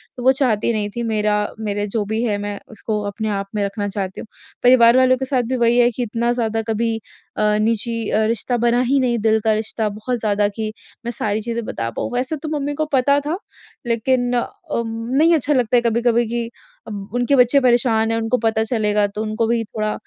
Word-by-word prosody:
तो 245 Hz, -, -7 dB
वो 260 Hz, -, +6 dB
चाहती 250 Hz, -5 st, +1 dB
नहीं 210 Hz, -2 st, -1 dB
थी 235 Hz, +3 st, -5 dB
मेरा 215 Hz, -2 st, +1 dB, 0.2 s
मेरे 205 Hz, -1 st, -2 dB
जो 210 Hz, +1 st, -1 dB
भी 220 Hz, +2 st, -2 dB
है 210 Hz, -4 st, 0 dB
मैं 205 Hz, 0 st, -4 dB
उसको 215 Hz, 0 st, -3 dB
अपने 215 Hz, +2 st, -3 dB
आप 200 Hz, -1 st, -2 dB
में 205 Hz, -, 0 dB
रखना 200 Hz, +1 st, -2 dB
चाहती 190 Hz, -1 st, -4 dB
हूँ। -, -, -10 dB, 0.4 s
परिवार 245 Hz, -1 st, +6 dB
वालों 255 Hz, 0 st, +4 dB
के 265 Hz, -, -3 dB
साथ 260 Hz, -2 st, +1 dB
भी 260 Hz, -, 0 dB
वही 235 Hz, 0 st, +3 dB
है 240 Hz, 0 st, +5 dB
कि 245 Hz, +2 st, -3 dB
इतना 235 Hz, +1 st, -1 dB
ज़्यादा 225 Hz, -2 st, -1 dB
कभी 225 Hz, +1 st, 0 dB, 0.4 s
अ, 210 Hz, 0 st, +2 dB
निजी 230 Hz, 0 st, -1 dB
अ, 220 Hz, -, +2 dB
रिश्ता 230 Hz, +2 st, -1 dB
बना 240 Hz, +1 st, +2 dB
ही 275 Hz, +1 st, +3 dB
नहीं 245 Hz, -2 st, +1 dB
दिल 220 Hz, 0 st, +4 dB
का 220 Hz, -, +4 dB
रिश्ता 220 Hz, 0 st, -2 dB
बहुत 220 Hz, +4 st, -3 dB
ज़्यादा 205 Hz, -1 st, +1 dB
कि 215 Hz, -1 st, -3 dB, 0.3 s
मैं 235 Hz, -, -2 dB
सारी 215 Hz, -1 st, -2 dB
चीज़ें 235 Hz, +1 st, -3 dB
बता 115 Hz, -, -3 dB
पाऊँ। -, -, -2 dB
वैसे 255 Hz, +5 st, -1 dB
तो 310 Hz, -, -3 dB
मम्मी 285 Hz, +1 st, -2 dB
को -, -, +2 dB
पता 280 Hz, +2 st, +4 dB
था 325 Hz, +4 st, -1 dB, 0.5 s
लेकिन 245 Hz, +2 st, +1 dB
अ, 240 Hz, -, 0 dB, 0.3 s
नहीं 235 Hz, +8 st, +1 dB
अच्छा 295 Hz, -1 st, +1 dB
लगता 245 Hz, -2 st, +3 dB
कभी-कभी 235 Hz, +1 st, +2 dB
कि 235 Hz, 0 st, -3 dB, 0.4 s
अब 200 Hz, -2 st, -7 dB
उनके 245 Hz, +3 st, +2 dB
बच्चे 250 Hz, +2 st, +5 dB
परेशान 235 Hz, -3 st, +2 dB
हैं 225 Hz, -, 0 dB
उनको 225 Hz, +2 st, 0 dB
पता 220 Hz, 0 st, +2 dB
चलेगा 210 Hz, -2 st, +1 dB
तो 205 Hz, +1 st, -6 dB
उनको 220 Hz, +1 st, -1 dB
भी 230 Hz, 0 st, +1 dB
थोड़ा 215 Hz, 0 st, -3 dB
230 Hz, 215 wpm, -20 LUFS, 215-245 Hz, 0.5 s, वो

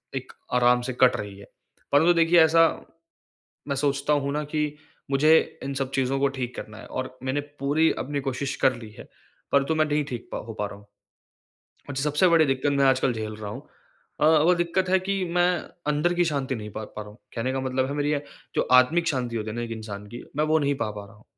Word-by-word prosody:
एक -, -, -6 dB, 0.2 s
आराम 125 Hz, 0 st, +4 dB
से -, -, -2 dB
कट 130 Hz, -1 st, +6 dB
रही 100 Hz, -1 st, -7 dB
है। 100 Hz, -, -12 dB, 0.5 s
परंतु 160 Hz, +5 st, +5 dB
देखिए 165 Hz, +1 st, +4 dB
ऐसा, 165 Hz, +1 st, +5 dB, 1.0 s
मैं 140 Hz, -, -1 dB
सोचता 140 Hz, +1 st, 0 dB
हूँ 140 Hz, -1 st, 0 dB
ना 150 Hz, +1 st, -1 dB
कि 150 Hz, 0 st, -2 dB, 0.4 s
मुझे 140 Hz, +3 st, +3 dB, 0.4 s
इन 140 Hz, -, -3 dB
सब 135 Hz, -1 st, -2 dB
चीज़ों 135 Hz, 0 st, 0 dB
को 140 Hz, -, +3 dB
ठीक 125 Hz, -1 st, -3 dB
करना 110 Hz, +1 st, -8 dB
है -, -, -11 dB
और 130 Hz, 0 st, -6 dB
मैंने 135 Hz, +2 st, 0 dB, 0.2 s
पूरी 150 Hz, +4 st, +3 dB
अपनी 145 Hz, +1 st, -3 dB
कोशिश 135 Hz, 0 st, -3 dB
कर 130 Hz, -, +4 dB
ली 115 Hz, -2 st, -10 dB
है, -, -, -9 dB, 0.5 s
परंतु 140 Hz, +3 st, +3 dB
मैं 155 Hz, -, +3 dB
नहीं 150 Hz, 0 st, 0 dB
ठीक 125 Hz, -4 st, -7 dB
प -, -, -2 dB
हो 115 Hz, -, -6 dB
पा 105 Hz, -, 0 dB
रहा 100 Hz, -, -9 dB
हूँ। 100 Hz, 0 st, -18 dB, 1.0 s
और 140 Hz, -, -6 dB
सबसे 150 Hz, +6 st, +2 dB
बड़ी 165 Hz, -2 st, +5 dB
दिक्कत 135 Hz, +1 st, 0 dB
मैं 140 Hz, 0 st, +3 dB
आजकल 130 Hz, -1 st, +3 dB
झेल 110 Hz, -1 st, -5 dB
रहा 105 Hz, -1 st, -6 dB
हूँ, -, -, -7 dB, 0.6 s
अ, -, -, +4 dB
वो 160 Hz, +3 st, +5 dB
दिक्कत 175 Hz, +2 st, 0 dB
है 190 Hz, -, +4 dB
कि 195 Hz, 0 st, -1 dB
मैं 175 Hz, 0 st, +4 dB, 0.4 s
अंदर 165 Hz, +4 st, +1 dB
की 175 Hz, 0 st, +2 dB
शांति 140 Hz, -5 st, -1 dB
नहीं 105 Hz, -1 st, -7 dB
पा, 110 Hz, +1 st, -6 dB
पा 105 Hz, 0 st, -8 dB
रहा 105 Hz, -, -11 dB
हूँ। 105 Hz, -, -17 dB, 0.2 s
कहने 125 Hz, +3 st, -1 dB
का 135 Hz, -, -1 dB
मतलब 130 Hz, 0 st, -1 dB
है 140 Hz, -, -4 dB
मेरी 145 Hz, 0 st, 0 dB
ये, 145 Hz, -1 st, -1 dB, 0.3 s
जो -, -, +2 dB
आत्मिक 145 Hz, +7 st, +5 dB
शांति 125 Hz, -4 st, -2 dB
होती 110 Hz, 0 st, -3 dB
है 110 Hz, -, -6 dB
ना 120 Hz, -, -2 dB
एक 120 Hz, -, -5 dB
इंसान 105 Hz, -2 st, -7 dB
की 120 Hz, -, -8 dB
मैं 150 Hz, -, +2 dB
वो 155 Hz, +1 st, +3 dB
नहीं 145 Hz, -1 st, +1 dB
पा, 130 Hz, -6 st, -2 dB
पा 105 Hz, -1 st, -8 dB
रहा 110 Hz, -, -17 dB
हूँ। 105 Hz, -, -22 dB
140 Hz, 235 wpm, -25 LUFS, 120-150 Hz, 1.0 s, कट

